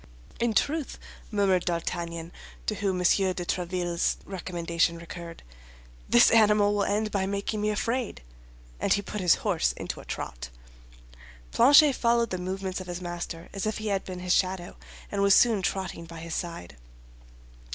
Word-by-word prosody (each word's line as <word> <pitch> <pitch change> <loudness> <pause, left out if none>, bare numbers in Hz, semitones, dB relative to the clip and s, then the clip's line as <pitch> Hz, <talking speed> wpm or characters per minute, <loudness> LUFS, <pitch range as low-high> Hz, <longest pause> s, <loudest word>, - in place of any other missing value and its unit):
"In 235 -2 0
truth," 300 -1 0 0.3
murmured 195 -4 +2
D'Artagnan, 170 -1 -3 0.3
to - - 0
whom 195 -3 -1
M. 180 - -2
de 185 -1 +2
Tréville's 175 -1 -1
recommendation 170 -3 -1
recurred, 170 0 -9 0.7
"this 120 - +6
animal 210 -2 +5
will 205 -1 +1
end 210 +1 0
by 190 -1 0
making 200 +2 -2
me 210 - +1
afraid." 230 - -2 0.6
And - - -1
he 200 - 0
put 210 +1 -5
his 180 -2 +5
horse - - +1
into - - -6
a - - -12
trot. - - -6 1.0
Planchet 285 +4 +7
followed 235 -2 +1
the 185 - -2
movements 190 +1 -4
of 185 - -9
his 175 0 -4
master 175 -1 -6
as 195 +1 -3
if 215 - -1
he 215 0 -3
had 195 -1 0
been 180 -1 -7
his 180 0 +1
shadow, 185 -2 0 0.4
and 200 - -1
was 200 -1 +6
soon 225 -5 +4
trotting 185 -3 -3
by 165 0 -10
his 165 0 -6
side. 90 - -5
185 Hz, 160 wpm, -27 LUFS, 170-210 Hz, 1.0 s, Planchet